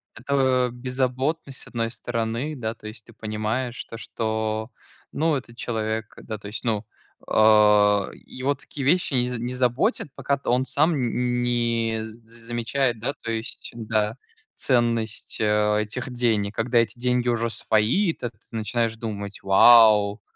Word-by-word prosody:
Это 130 0 +1
беззаботность 130 +3 -2
с - - -7
одной 115 -1 -2
стороны. 115 +5 -3
Да, 115 -3 -3
то 110 - -11
есть 110 0 -9
ты - - -16
понимаешь 110 +3 -3
то, 115 - -9
что, 110 0 -3 0.4
ну, 160 0 +1
этот 120 -3 -7
человек, 110 -2 -3
да, 110 -1 -5
то 100 - -10
есть, 105 - -6
ну, 110 -2 0 0.4
э, - - -12
его 105 +5 +3
такие 135 +1 -7
вещи 170 -1 +2
не 125 -1 +3
не 120 +2 -4
заботят, 125 - +1
пока 140 +1 0
т 135 - -5
он 125 +2 +2
сам 155 +5 +2
н 125 -2 0
не 115 -2 0
з 110 0 -9 0.3
замечает, 120 0 0
да, 135 +5 -2
то 115 - -4
есть, 110 0 -5
да, 110 0 -1 0.4
ценность, 115 -2 0
э, 105 0 +2
этих 125 +5 -5
денег. 110 -4 0
Когда 120 +1 +2
эти 115 +1 0
деньги 125 0 +1
уже 115 0 0
свои, 115 - +2
тэт 120 - -6 0.2
ты - - -10
начинаешь 115 +1 0
думать: 100 -3 -6
"Вау, 105 0 +6
115 Hz, 155 wpm, -24 LUFS, 110-125 Hz, 0.4 s, Вау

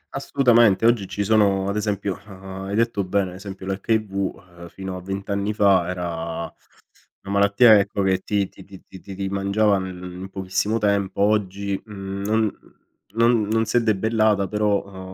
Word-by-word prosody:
Assolutamente. 120 -7 +3
Oggi 115 -5 +3
ci 105 - -3
sono 100 -2 +2
ad 100 - -2
esempio, 100 -2 -2
uhm, 95 0 -9
hai 100 +1 -3
detto 115 -3 +1
bene 95 0 0
ad - - -10
esempio 95 -1 -9
l'HIV, 100 +2 -1 0.5
ehm. 85 - -9
fino 95 +1 -7
a 90 - -7
20 95 +1 -5
anni 100 +1 -1
fa 95 -4 +3
era 85 -2 -4 0.8
una 100 0 -5
malattia 100 +2 +6
ecco 100 0 -1
che 95 -1 +2
ti 100 0 -1
ti 95 - -15
ti 95 -1 -13
ti 95 - -13
ti 95 -1 -10
ti 95 0 -3
mangiava 100 +1 +1
nel 95 -1 -6 0.2
in 95 +1 -8
pochissimo 95 +3 -1
tempo. 100 -2 0
Oggi, 100 -1 0
mhmm, 100 -2 -7
non 110 -1 +1 0.6
non 115 -2 +3
non 115 +1 +1
si 115 - 0
è - - +4
debellata 110 -2 +1
però, 100 -3 -2
100 Hz, 175 wpm, -22 LUFS, 95-105 Hz, 0.8 s, malattia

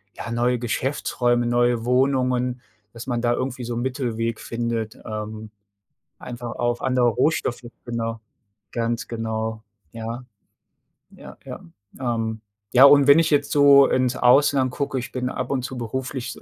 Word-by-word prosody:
ja, 115 - -7
neue 120 +1 +1
Geschäftsräume, 120 -1 -1
neue 120 -1 +1
Wohnungen 125 -1 +1 0.3
dass 115 0 -9
man 120 -2 -1
da 120 0 +2
irgendwie 130 0 -3
so 120 - -4
'n 120 - -2
Mittelweg 115 -4 -2
findet, 115 -1 -3
ähm, 110 0 -6 0.7
einfach 120 -1 -7
auf 120 0 -1
andere 125 -2 +2
Rohstoffe 125 0 0 0.2
genau. 115 -1 -3 0.5
Ganz 115 0 -2
genau. 110 -1 -4 0.3
Ja. 115 +2 -6 0.9
Ja, - - -13
ja. - - -7 0.4
Ähm, 115 -3 -2 0.3
ja, 130 +2 +8
und 140 0 +7
wenn 140 +3 +8
ich 165 -1 +2
jetzt 145 -2 +1
so 140 -1 +7
ins 130 -1 +1
Ausland 130 0 +4
gucke, 140 0 -3
ich 120 - -7
bin 125 -1 -3
ab 125 0 -4
und 130 -2 -1
zu 130 0 -6
beruflich, 130 +2 -5
120 Hz, 145 wpm, -23 LUFS, 115-130 Hz, 0.9 s, ja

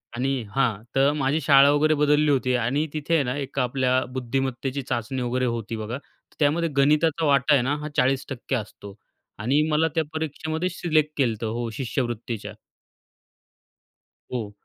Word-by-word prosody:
आणि 130 0 -1
हां, 115 -6 +1
तर 135 +1 +4
माझी 140 +3 +1
शाळा 140 0 +6
वगैरे 155 +2 +3
बदलली 150 0 +3
होती 130 -2 +1
आणि 140 +6 0
तिथे 155 +2 -2
आहे 155 - +3
ना 125 +1 -2
एका 135 -1 -2
आपल्या 130 0 +1
बुद्धिमत्तेची 130 +1 -2
चाचणी 125 +1 -3
वगैरे 125 +1 0
होती 115 -1 -3
बघा. 110 +3 -4
तर 140 - -24
त्यामध्ये 160 +3 +2
गणिताचा 155 +3 +3
वाटा 140 0 +4
आहे 140 - +5
ना 140 +3 0
हा 150 - -5
40% 135 0 0
असतो 100 -3 -7 0.4
आणि 130 +7 +2
मला 155 +1 +2
त्या 160 - +2
परीक्षेमध्ये 160 +2 -2
सिलेक्ट 155 -4 0
केलत 115 -5 0
हो, 115 +1 -2
शिष्यवृत्तीच्या. 120 -3 -3 1.8
हो 110 -5 -3
135 Hz, 150 wpm, -24 LUFS, 125-150 Hz, 1.8 s, शाळा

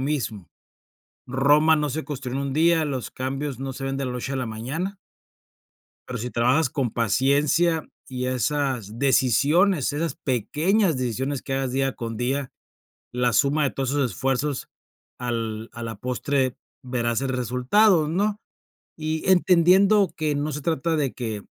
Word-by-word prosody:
mismo. 125 - -3 0.8
Roma 145 +5 +4
no 150 -1 0
se 155 +4 -3
construyó 130 -3 -5
en 140 - -1
un 135 - -3
día, 160 +2 +3
los 135 -4 -3
cambios 135 0 -4
no 135 0 -4
se 135 - -8
ven 135 0 -2
de 140 - -2
la 125 - -3
noche 125 +2 -4
a - - -1
la 130 -2 -2
mañana. 145 - -4 1.1
Pero 125 -3 -4
si 125 - -4
trabajas 130 +5 +2
con 130 -5 -1
paciencia 145 - +2 0.2
y 125 -1 -4
esas 130 -4 -1
decisiones, 140 - +3
esas 155 +3 -2
pequeñas 155 - +1
decisiones 130 +3 -2
que 135 - -5
hagas 135 -1 -1
día 135 0 0
con 115 -1 -5
día, 130 +3 -2 0.6
la 125 -1 +1
suma 140 +6 +2
de 140 - +1
todos 135 -1 -2
esos 140 -5 0
esfuerzos 135 - -1 0.5
al 115 -2 -3
a 120 - -9
la 115 -1 -5
postre 130 +3 -1 0.3
verás 120 -1 -1
el 135 - -2
resultado, 130 - +3
¿no? 205 +5 0 0.6
Y 155 +2 -2
entendiendo 185 +2 +5
que 155 -2 0
no 145 +2 -1
se 150 +1 -4
trata 160 +1 0
de 140 -4 -1
que 110 -5 -5
135 Hz, 160 wpm, -24 LUFS, 125-155 Hz, 1.1 s, entendiendo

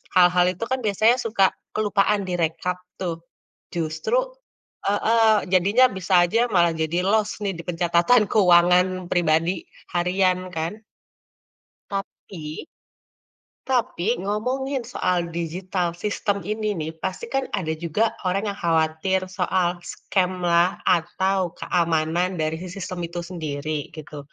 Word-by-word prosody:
hal-hal 180 0 +5
itu 185 +5 -6
kan 260 +2 -1
biasanya 220 +3 +4
suka 215 -6 +1 0.2
kelupaan 205 -1 +1
direkap 175 0 -1 0.2
tuh, 170 -3 -4 0.5
justru 160 - -1 0.7
heeh, 215 0 +3
jadinya 200 +8 +5
bisa 190 +1 -2
aja 230 +7 +2
malah 170 -1 +5
jadi 160 +2 -1
los 215 0 +2
nih 195 -1 -1
di 170 - -7
pencatatan 175 +6 +3
keuangan 180 -1 +4
pribadi 165 +1 +1 0.3
harian 185 +1 +2
kan. 170 +7 -4 1.1
Tapi 185 - -6 1.0
tapi 230 -6 0 0.2
ngomongin 255 +6 -1
soal 180 -5 +1 0.2
digital 180 +2 -2
sistem 205 -1 0 0.2
ini 215 0 -2
nih 155 +1 -3
pasti 330 - -3
kan 270 0 +1
ada 160 - -4
juga 170 +7 +1 0.2
orang 195 +3 0
yang 200 - -5
khawatir 165 +3 +1 0.2
soal 180 -1 +1 0.2
scam 185 -2 0 0.2
lah 170 +1 +5 0.3
atau 190 +3 -1 0.2
keamanan 170 +1 +1
dari 155 +1 -1
si 185 - -6
sistem 185 -1 -5
itu 170 +1 -6
sendiri 155 -3 -3 0.2
gitu, 150 -1 -8
180 Hz, 120 wpm, -23 LUFS, 170-205 Hz, 1.1 s, hal-hal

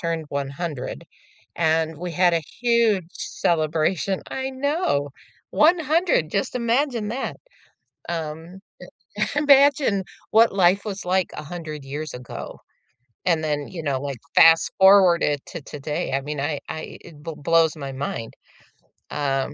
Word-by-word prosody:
turned 165 -2 -2
100, 140 +1 -4 0.5
and 160 -1 +1
we 175 0 -5
had 175 +1 +3
a 165 - 0 0.2
huge 230 -7 +3
celebration, 160 +3 0
I 265 0 -3
know, 265 - -1 0.4
100, 320 - +3
just 195 +6 -1
imagine 240 -1 0
that, 250 +5 -4 0.7
um, 165 +2 -5 0.8
imagine 280 -7 +4 0.3
what 225 +1 +5
life 190 0 +3
was 200 -2 -5
like 185 0 +1
100 155 -2 -7
years 150 +3 -5
ago, 125 -1 -8 0.6
and 165 -3 +2
then, 145 -2 -2
you 170 -3 -7
know, 140 -4 -1
like, 140 -2 -5 0.2
fast-forward 180 +2 +6
it 145 -2 0
to - - -7
today, 150 +1 -4
I 135 - +1
mean, 150 +1 -4
I 145 0 -2
I 155 - -7
it 155 -4 -14
b 165 - -5
blows 165 +1 +3
my 140 -3 -6
mind. 130 -4 -5 0.8
Um 135 -1 -1
165 Hz, 130 wpm, -23 LUFS, 150-205 Hz, 0.8 s, fast-forward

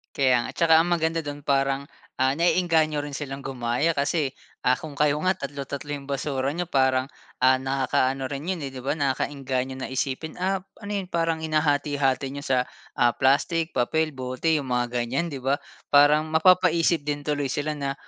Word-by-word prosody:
Kaya 130 -3 +3
nga, - - -5
at - - -15
tsaka 165 -1 +4
ang 175 - -3
maganda 165 -1 +1
dun 145 -1 -6
parang, 135 0 +1 0.3
ah, 130 0 +3
nae-engganyo 165 -2 +2
rin 145 -1 -6
silang 135 -1 -5
gumaya 130 +5 0
kasi, 140 -1 0 0.3
ah, 125 - +6
kung 145 +1 -9
kayo 150 0 +2
nga 185 +1 +1
tatlo-tatlo 140 0 -6
'yong 145 -1 -6
basura 135 -1 -1
n'yo, 175 +4 -3
parang, 130 -4 +2 0.3
ah, 130 +1 +5
nakakaano 135 0 0
rin 140 +6 -4
'yon, 185 - -1
eh, 135 - -8
'di 130 - -7
ba? 145 +4 -2
nakaka-engganyo 135 -1 -2
na 130 - -4
isipin, 130 +4 -3
ap 190 +1 -2 0.2
ano 205 - -7
yun, 190 - -4
parang 165 -2 0
hinahati-hati 145 -3 +1
n'yo 140 - -6
sa, 130 -3 +1 0.3
ah, 120 -1 +4
plastic, 155 +4 +2
papel, 155 +6 0
bote, 130 +3 -2
'yong 150 -4 +1
mga 125 -1 0
ganyan, 130 +8 -1
'di 140 - -5
ba? 135 +2 +1 0.4
Parang 150 +2 +6
mapapaisip 165 -1 +3
din 145 0 -2
tuloy 145 -1 -1
sila 150 +3 -2
na, 140 -1 -2
145 Hz, 185 wpm, -25 LUFS, 135-160 Hz, 0.4 s, ah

